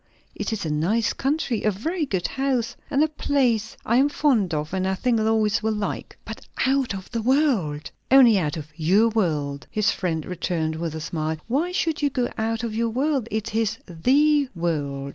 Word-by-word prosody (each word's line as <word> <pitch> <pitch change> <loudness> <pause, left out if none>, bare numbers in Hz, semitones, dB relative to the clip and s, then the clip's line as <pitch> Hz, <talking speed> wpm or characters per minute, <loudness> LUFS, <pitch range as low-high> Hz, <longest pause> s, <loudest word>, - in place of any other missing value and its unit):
"It - - -4
is 215 -5 -3
a 155 - -1
nice 195 +10 +1
country, 270 -4 -1
a 215 - +3
very 305 - -2
good 190 -7 -2
house, 265 -4 -1
and 280 +2 +3
a - - +3
place 255 -7 0
I 235 - +3
am 275 +3 +4
fond 255 - +2
of, 155 +1 -3
and 190 0 0
I 190 - 0
think 235 +3 +1
Lois 220 0 +2
will 220 0 0
like." 210 -1 -4
"But - - -8 0.2
out 265 -5 +1
of 190 -1 -9
the 230 -2 -2
world!" 225 - +1 0.2
"Only 250 -6 +7
out 155 -2 -2
of 155 -1 -7
your 190 +8 +3
world," 150 -10 -1
his 215 -1 +1
friend 165 -5 -2
returned, 165 -3 -2
with 160 -1 -4
a 160 - -5
smile. 155 0 -2
"Why 295 +9 0
should 325 -4 -1
you 290 - +2
go 250 -3 -1
out 225 +1 -2
of 225 -2 -3
our 230 0 +1
world? 265 0 0
it 220 -1 -3
is 225 0 0
the 275 - +2
world." 145 -5 -2
220 Hz, 200 wpm, -24 LUFS, 170-260 Hz, 0.2 s, Only